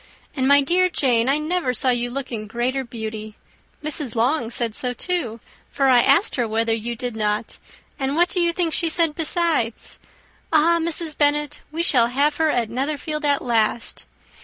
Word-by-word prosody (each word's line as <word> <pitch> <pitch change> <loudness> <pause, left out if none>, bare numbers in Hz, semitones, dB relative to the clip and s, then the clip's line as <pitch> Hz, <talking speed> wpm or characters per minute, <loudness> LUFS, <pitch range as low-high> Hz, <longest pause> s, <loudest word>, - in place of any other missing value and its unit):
And, 260 -2 0
my 285 +1 +6
dear 360 +6 +2
Jane, 250 -7 +1
I 280 - +3
never 305 -4 -1
saw 255 - +4
you 245 0 -1
look 265 +1 -6
in 215 -2 -5
greater 250 +5 -2
beauty. 220 -3 -7 0.5
Mrs. 295 -5 -4
Long 240 +1 +1
said 235 -2 -1
so 250 +2 -2
too, 250 -8 -3 0.3
for 275 -1 +1
I 250 -2 +6
asked 280 - +3
her 240 -2 0
whether 225 +1 0
you 230 +2 -3
did 245 0 -5
not. 210 0 -2 0.4
And 270 +1 -1
what 345 +2 +3
do 365 - +1
you 340 -1 +3
think 335 -2 -1
she 335 - +1
said 330 -1 +2
besides? 320 -7 -1 0.5
'Ah! 330 +2 +3
Mrs. 330 -1 0
Bennet, 295 0 0
we 330 +2 -2
shall 245 -8 +4
have 285 +4 0
her 320 -1 +2
at 235 -6 -1
Netherfield 300 +4 -3
at 285 -1 +1
last! 230 -1 -1
270 Hz, 185 wpm, -21 LUFS, 235-310 Hz, 0.5 s, my